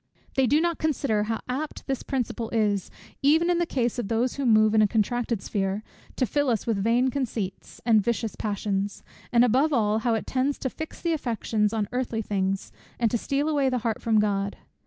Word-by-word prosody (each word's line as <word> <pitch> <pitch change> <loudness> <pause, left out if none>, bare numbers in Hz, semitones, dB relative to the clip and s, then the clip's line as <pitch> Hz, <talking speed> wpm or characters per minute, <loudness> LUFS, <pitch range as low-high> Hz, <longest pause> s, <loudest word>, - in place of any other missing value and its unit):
They 265 -1 +3
do 290 +6 +4
not 340 0 0
consider 265 -9 +1
how 225 0 -2
apt 280 +5 -4
this 270 -2 -2
principle 240 -4 -3
is, 210 -4 0 0.3
even 320 +5 +4
in 345 - +2
the 345 - +1
case 245 -4 -1
of 230 - -2
those 230 +3 +1
who 275 -2 -2
move 215 -1 +5
in 220 - +5
a 210 - +5
contracted 230 0 0
sphere, 195 +1 -1 0.3
to 255 - +1
fill 285 +4 0
us 225 -4 0
with 210 -4 0
vain 245 +4 +3
conceits, 230 -8 -4
and 225 -3 +5
vicious 225 +1 -1
passions; 200 -1 -2 0.3
and 240 0 +5
above 265 +6 +3
all 215 -5 +2
how 230 0 +1
it 220 - -3
tends 265 +2 0
to 260 - -3
fix 315 - -7
the 335 -1 0
affections 225 -6 0
on 220 -2 -1
earthly 245 -3 -2
things, 195 -1 -1 0.3
and 230 -3 +1
to 235 - +2
steal 280 +5 -1
away 285 -4 +2
the 255 - 0
heart 225 -2 -1
from 220 -2 +3
God. 200 -1 0
230 Hz, 205 wpm, -26 LUFS, 210-265 Hz, 0.3 s, move